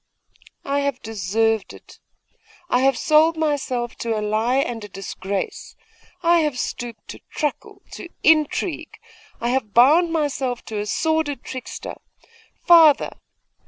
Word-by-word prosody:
'I 280 +1 0
have 280 -2 -2
deserved 220 +1 -1
it! - - -16 0.7
I 250 - +4
have 270 0 +2
sold 315 +1 +3
myself 265 -6 -2
to 230 -2 -2
a - - -1
lie 215 +4 0
and 240 -5 -2
a - - -7
disgrace! 195 0 -5 0.5
I 340 0 +4
have 300 -5 -1
stooped 240 -2 -5
to - - -8
truckle, 300 -3 -4
to 345 - -9
intrigue! 315 +1 +1 0.4
I 235 - -1
have 245 -5 -2
bound 310 +8 +5
myself 275 -6 -2
to 215 -2 -5
a 205 - -4
sordid 315 +1 -1
trickster! 255 -1 -8 0.6
Father! 325 -4 +6
265 Hz, 130 wpm, -22 LUFS, 225-310 Hz, 0.7 s, Father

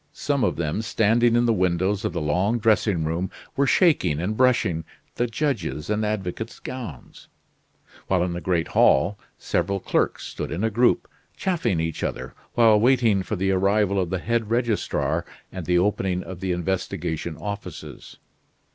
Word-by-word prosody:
Some 140 -3 -1
of - - +1
them 80 +5 -2
standing 115 +2 +2
in 120 0 +3
the 115 - +3
windows 95 +1 +1
of - - -1
the - - -3
long 90 +10 +1
dressing 110 -6 +2
room 85 +4 -2 0.3
were 140 -1 +2
shaking 120 - +3
and 95 +6 -2
brushing 115 -10 +2 0.3
the 120 - 0
judges' 115 - -2
and 105 +1 0
advocates' 105 +1 -3
gowns; 120 - -8 0.8
while 90 -2 +2
in 90 -1 -2
the 85 - -4
great 85 -3 0
hall 90 +10 +3 0.2
several 100 0 -1
clerks - - -1
stood - - -5
in 90 +6 -2
a 115 - +1
group, 120 +3 +2 0.3
chaffing 140 - 0
each 80 -1 -3
other - - -4 0.2
while 115 -3 +6
waiting 115 -4 +3
for 95 +3 -3
the 95 +1 0
arrival 100 +1 +2
of 90 -3 -1
the 95 - -1
head 115 +3 -1
registrar 115 -2 0 0.3
and 90 -4 -7
the 90 0 +3
opening 90 -1 0
of 95 -2 -8
the 95 0 -2
investigation 85 -2 -3
offices. 100 -7 -7
100 Hz, 165 wpm, -24 LUFS, 90-115 Hz, 0.8 s, while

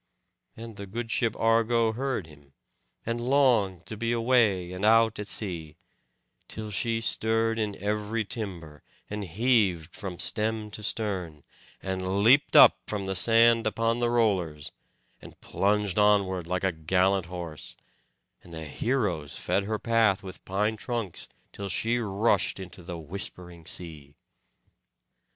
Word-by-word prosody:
And 115 -2 -9
the 100 - -7
good 115 +4 -5
ship 115 -2 0
Argo 115 0 +2
heard 130 -5 -2
him, 70 -3 -18 0.5
and 115 +1 -2
longed 120 - +2
to 110 - -7
be 115 +2 -2
away 115 -7 +2
and 90 +2 -6
out 115 0 +4
at 105 - -5
sea; 85 -8 -2 0.7
till 110 -1 -7
she 115 +3 0
stirred 115 0 0
in 105 -2 -2
every 105 +3 -2
timber, 85 -9 -7 0.3
and 105 0 -3
heaved 95 -4 +1
from 95 -3 -6
stem 110 +1 0
to 105 - -7
stern, 95 -9 -3 0.4
and 95 +1 -1
leapt 130 +6 +5
up - - +8
from 100 -2 -3
the 95 - -2
sand 115 +4 +4
upon 115 +2 0
the 120 -1 +1
rollers, 95 -11 0 0.5
and - - -14
plunged 105 0 0
onward 100 -4 +2
like 90 +1 -2
a 95 - +2
gallant 90 +3 +1
horse; 85 -4 -7 0.7
and 85 - -15
the 80 -1 -7
heroes 90 - -2
fed 100 - -1
her 110 +1 -2
path 110 -4 +2
with 95 -1 -9
pine 105 +3 -1
trunks, 115 -6 -5 0.2
till 100 -1 -6
she 115 +6 0
rushed 105 -1 +1
into 95 -1 -9
the 85 0 -7
whispering 85 0 -8
sea. 75 -5 -5
105 Hz, 140 wpm, -27 LUFS, 90-115 Hz, 0.7 s, up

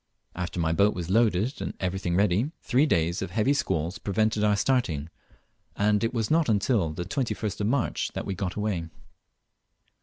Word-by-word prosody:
After 90 0 -4
my 80 -1 +1
boat 100 +5 +3
was 90 0 -4
loaded 110 +2 +2
and - - -4
everything 90 -1 -1
ready, 100 +7 +2
three 135 +4 +3
days 85 - +1
of 95 - -3
heavy 115 +6 +2
squalls 85 - -1
prevented 110 +1 0
our 105 -1 +4
starting, 95 - 0 0.7
and 105 +1 +2
it 115 - +1
was 115 -4 -2
not 160 0 +3
till 100 -6 +1
the 85 +3 -5
21st 110 -6 -2
of 100 - +1
March 125 +1 0
that - - -3
we 100 - -2
got 95 0 -3
away. 105 -6 -2
100 Hz, 175 wpm, -27 LUFS, 90-115 Hz, 0.7 s, our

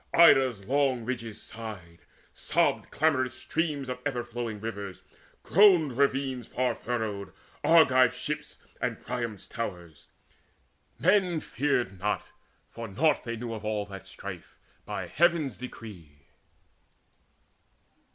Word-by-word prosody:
Ida's 130 -11 +6
long 130 -2 +1
ridges 115 -4 -4
sighed, 95 -7 -8 0.3
sobbed - - +1
clamorous 130 -5 +1
streams 150 -5 -2
Of 125 0 -4
ever 125 -4 -1
flowing 120 -3 -5
rivers, 100 -3 -6 0.4
groaned 175 - +5
ravines 135 -2 +1
Far 125 -1 0
furrowed, 110 -5 -3 0.3
Argive 130 -7 +6
ships, 150 +4 -4 0.2
and 115 -3 -1
Priam's 115 -5 -4
towers. 85 -9 -6 0.9
Yet 195 +4 +5
men 175 -4 -2
feared 120 -10 -1
not, 105 +2 -1 0.5
for 115 0 -6
naught 135 +11 +2
they 115 -1 -3
knew 115 0 -5
of 110 -1 -6
all 105 -1 -1
That 95 -1 -10
strife, 95 -2 -9 0.3
by - - -4
Heaven's 165 -7 +2
decree. 85 - -10
120 Hz, 115 wpm, -28 LUFS, 105-140 Hz, 0.9 s, Ida's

